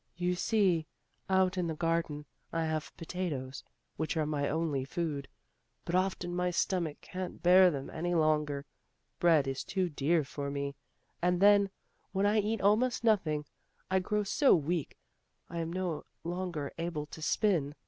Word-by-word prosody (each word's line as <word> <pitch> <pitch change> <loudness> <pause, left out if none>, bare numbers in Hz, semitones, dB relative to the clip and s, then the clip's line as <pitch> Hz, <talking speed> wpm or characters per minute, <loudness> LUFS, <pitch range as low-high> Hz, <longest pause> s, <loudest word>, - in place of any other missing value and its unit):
"You 180 0 +1
see, 180 -4 +2 0.4
out 190 -1 +3
in 175 - 0
the 160 - -2
garden, 165 -2 -1 0.3
I 165 -1 0
have 155 -1 -2
potatoes, 155 -7 -4 0.3
which 160 +1 -2
are 155 - +2
my 145 -2 -1
only 155 -3 0
food. 145 -1 -3 0.6
But 170 - -4
often 185 -1 0
my 180 0 +1
stomach 175 -3 -1
can't 185 -1 -6
bear 180 +1 +7
them 140 -5 -4
any 175 +2 -1
longer; 150 -3 +1 0.5
bread 160 -5 +4
is 135 0 -2
too 185 -2 -1
dear 155 +2 +1
for 140 0 -5
me, 140 0 -3 0.5
and 180 0 +2
then 200 0 +6 0.4
when 195 +1 +2
I 210 +1 +4
eat 215 +1 -1
almost 230 +5 +3
nothing, 165 -10 +2 0.5
I 190 - +4
grow 210 +3 0
so 270 +7 +4
weak, 160 0 -2 0.5
I 170 - -3
am 165 0 -2
no 180 -3 -3 0.2
longer 175 -4 -3
able 165 -3 -2
to 155 - -11
spin. 160 -5 +1
170 Hz, 160 wpm, -31 LUFS, 150-185 Hz, 0.6 s, bear